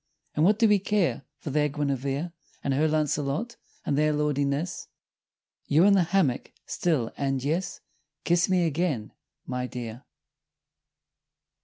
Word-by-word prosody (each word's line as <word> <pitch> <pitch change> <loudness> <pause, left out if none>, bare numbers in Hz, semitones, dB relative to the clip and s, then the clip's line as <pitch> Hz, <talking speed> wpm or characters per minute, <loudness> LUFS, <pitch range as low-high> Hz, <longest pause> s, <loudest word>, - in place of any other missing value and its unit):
And 150 - +1
what 205 +4 +5
do 225 0 +5
we 210 -1 +4
care 180 - 0
for 145 - -6
their 150 +1 +2
Guinevere 140 +2 -2 0.3
And 140 - 0
her 150 +4 +3
Launcelot 155 - -1 0.3
and 140 - +1
their 150 +1 +3
lordliness! 150 +2 -1 0.8
You 155 +4 +4
in 200 +1 +6
the 195 - +5
hammock 170 -8 0
still, 150 -10 0
and 135 -2 -1
Yes 165 +6 -2 0.4
Kiss 175 +1 +2
me 180 -2 +3
again, 155 -8 -1 0.3
my 125 0 -3
dear! 120 0 -7
150 Hz, 135 wpm, -27 LUFS, 135-175 Hz, 0.8 s, in